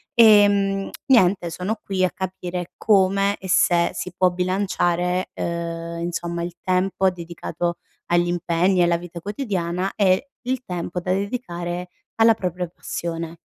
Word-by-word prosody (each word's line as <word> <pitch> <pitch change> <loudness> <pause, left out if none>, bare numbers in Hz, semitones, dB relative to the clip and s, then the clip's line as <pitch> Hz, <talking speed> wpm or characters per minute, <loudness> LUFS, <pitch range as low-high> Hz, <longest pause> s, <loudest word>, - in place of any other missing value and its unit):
ehm, 205 -3 +5 0.2
niente 190 -8 +4
sono 195 +6 -3
qui 190 -2 -1
a 185 - -1
capire 180 -2 -5
come 195 -1 +3
e 190 - -9
se 170 -1 +4
si 180 - -5
può 185 0 +4
bilanciare, 180 -1 0
uhm, 170 0 -4
insomma, 170 0 -3
il 175 0 -4
tempo 190 +1 +1
dedicato 170 0 -4 0.3
agli 175 0 +2
impegni 175 +1 +1
e - - +6
alla 170 0 +3
vita 170 0 -8
quotidiana 195 -4 -2
e 200 +7 +2
il 255 0 -2
tempo 180 -3 -4
da 180 +1 -3
dedicare 180 -4 -3 0.3
alla 225 0 +5
propria 180 -3 -3
passione. 165 -1 -5
180 Hz, 140 wpm, -22 LUFS, 175-195 Hz, 0.3 s, e